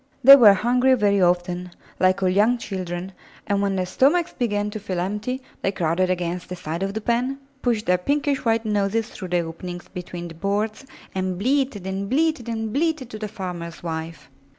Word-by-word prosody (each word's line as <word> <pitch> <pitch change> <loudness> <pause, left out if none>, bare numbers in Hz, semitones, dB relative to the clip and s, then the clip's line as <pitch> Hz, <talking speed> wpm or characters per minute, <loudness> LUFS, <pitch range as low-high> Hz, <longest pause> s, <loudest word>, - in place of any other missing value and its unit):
They 275 +2 +12
were 215 -7 +8
hungry 250 +5 +3
very 200 -4 +2
often, 180 0 +1 0.3
like 185 +1 +3
all 185 - +3
young 210 +6 +3
children, 185 -4 -5 0.3
and 200 -1 0
when 200 -1 0
their 185 -1 0
stomachs 295 - +2
began 210 -4 -1
to 215 - -5
feel 185 -3 -3
empty, 210 +8 -3 0.2
they 195 - +1
crowded 180 0 0
against 180 0 -2
the 180 - -4
side 165 0 -5
of 195 +1 -2
the 220 - -2
pen, 245 +4 0 0.2
pushed 230 -3 0
their 180 0 +3
pinkish 285 +5 0
white 225 -1 +1
noses 210 +1 0
through 185 - -7
the 175 -1 +1
openings 175 +2 -7
between 175 -1 -7
the 165 - -9
boards, 205 +8 -2 0.3
and 185 -1 -2
bleated 255 -2 0
and 195 +1 -3
bleated 305 -3 +1
and 220 -1 -3
bleated 305 -4 0
to 215 - -7
the 215 - -3
farmer's 180 -5 -7
wife. 165 0 -5
200 Hz, 190 wpm, -23 LUFS, 180-235 Hz, 0.3 s, They